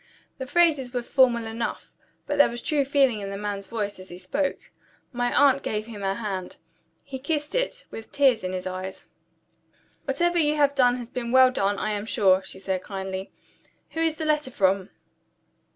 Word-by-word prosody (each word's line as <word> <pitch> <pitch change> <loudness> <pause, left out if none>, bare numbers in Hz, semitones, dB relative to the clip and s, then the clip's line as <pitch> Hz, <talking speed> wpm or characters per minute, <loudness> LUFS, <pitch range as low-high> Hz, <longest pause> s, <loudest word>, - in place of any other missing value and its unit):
The 260 - -5
phrases 290 -5 +2
were 245 - -1
formal 240 -2 +3
enough; 225 +1 -4 0.3
but 290 0 -2
there 285 - +7
was 240 +1 -7
true 295 -2 +1
feeling 270 -5 +3
in 200 -1 -5
the 195 - -5
man's 200 -1 -4
voice 205 -4 -3
as 185 - -11
he 175 - -9
spoke. 275 +11 -3 0.4
My 245 0 0
aunt 275 -1 +4
gave 215 0 -3
him 220 -3 -9
her 195 0 0
hand. 195 -5 -5 0.5
He 265 -1 -7
kissed 295 +2 -2
it, - - -2
with 225 - -7
the - - -38
tears 260 -6 +4
in 185 - -2
his 185 -1 -4
eyes. 185 +1 -6 1.0
"Whatever 345 +6 +1
you 300 -1 +3
have 285 -2 +3
done 250 -3 +3
has 240 -1 -8
been 235 -2 -4
well 260 0 +7
done, 200 -4 0
I 215 - -1
am 205 +1 -3
sure," 190 -4 +4
she 190 - -8
said 190 -1 -2
kindly. 190 -1 -5 0.6
"Who 325 - -5
is 325 -1 +1
the 315 - -4
letter 300 -3 +1
from?" 195 -4 +1
235 Hz, 195 wpm, -25 LUFS, 195-280 Hz, 1.0 s, there